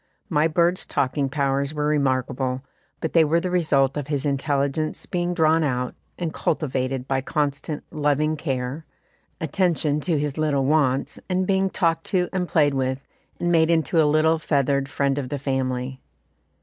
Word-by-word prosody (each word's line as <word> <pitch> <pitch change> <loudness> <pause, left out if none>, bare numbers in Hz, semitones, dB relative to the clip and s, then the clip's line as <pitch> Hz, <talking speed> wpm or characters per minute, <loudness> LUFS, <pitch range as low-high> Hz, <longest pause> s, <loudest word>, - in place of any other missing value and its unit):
My 155 -1 +3
bird's 170 +3 +1
talking 135 +1 0
powers 140 +1 0
were 150 0 -1
remarkable, 130 -3 0 0.4
but 160 - -3
they 165 - +6
were 160 +2 +2
the 180 +1 -3
result 140 -6 +2
of 145 -2 -3
his 145 -1 -2
intelligence 140 +2 -1
being 175 0 -2
drawn 160 0 +3
out 125 -3 -1 0.2
and 170 -3 -3
cultivated 130 -4 -1
by 135 -1 0
constant, 145 +1 -2
loving 150 0 +1
care, 135 0 -3 0.6
attention 160 -2 +1
to 160 +1 0
his 145 +1 -2
little 145 -3 +1
wants, 140 -3 +1
and 185 0 +1
being 190 0 +2
talked 165 -3 0
to 180 -2 0
and 180 -2 -1
played 145 -3 +3
with, 130 0 -2 0.3
and 175 - 0
made 160 -1 +4
into 165 -1 +3
a 150 - +3
little 160 +2 +3
feathered 140 -3 +1
friend 140 0 0
of 130 -3 -5
the 145 - -2
family. 130 -1 -2
150 Hz, 160 wpm, -23 LUFS, 135-160 Hz, 0.6 s, they